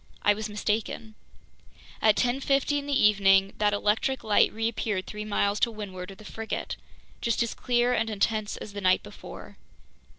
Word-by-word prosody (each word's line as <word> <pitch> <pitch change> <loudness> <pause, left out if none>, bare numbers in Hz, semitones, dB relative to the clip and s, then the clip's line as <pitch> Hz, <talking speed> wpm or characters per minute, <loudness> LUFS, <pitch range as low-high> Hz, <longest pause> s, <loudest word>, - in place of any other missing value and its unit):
I 205 - +5
was 215 +1 -5
mistaken. 215 +1 -2 0.9
At 215 -2 +5
10:50 275 +3 +1
in 285 - -8
the 280 -1 +1
evening, 195 -2 +4
that 210 -1 +3
electric 210 +6 0
light 210 -1 +4
reappeared 220 -3 -2
three 210 0 -6
miles 205 0 0
to - - +3
windward 195 -4 -7
of 195 - -11
the 215 - -14
frigate, 225 +1 -4 0.5
just 235 0 +1
as 235 - -3
clear 245 0 +1
and 225 -2 0
intense 215 0 -1
as 205 - -9
the 205 - -5
night 185 -1 +3
before. - - -11
215 Hz, 165 wpm, -27 LUFS, 205-230 Hz, 0.9 s, I